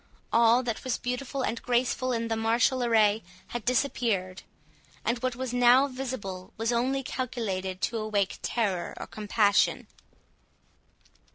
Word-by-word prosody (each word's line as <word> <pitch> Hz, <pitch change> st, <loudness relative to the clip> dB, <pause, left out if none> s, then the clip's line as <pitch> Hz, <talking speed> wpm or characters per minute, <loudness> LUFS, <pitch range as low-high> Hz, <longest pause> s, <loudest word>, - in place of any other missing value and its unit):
All 235 Hz, +2 st, +5 dB
that 230 Hz, -3 st, -3 dB
was 255 Hz, -2 st, -1 dB
beautiful 250 Hz, +2 st, -3 dB
and 230 Hz, -, -2 dB
graceful 250 Hz, +1 st, 0 dB
in 230 Hz, -1 st, -1 dB
the 225 Hz, -, -1 dB
martial 230 Hz, +3 st, +2 dB
array 220 Hz, -2 st, +3 dB, 0.3 s
had 240 Hz, -2 st, -4 dB
disappeared, 225 Hz, -7 st, 0 dB, 0.6 s
and 235 Hz, +1 st, 0 dB
what 255 Hz, 0 st, -2 dB
was 255 Hz, -1 st, -4 dB
now 245 Hz, +2 st, +6 dB
visible 245 Hz, -9 st, -6 dB
was 225 Hz, +2 st, 0 dB
only 265 Hz, +3 st, 0 dB
calculated 195 Hz, -8 st, -3 dB
to 230 Hz, -, -1 dB
awake 210 Hz, -3 st, -1 dB
terror 200 Hz, -7 st, -1 dB
or -, -, -6 dB
compassion. 210 Hz, -1 st, +2 dB
235 Hz, 130 wpm, -28 LUFS, 215-255 Hz, 0.6 s, now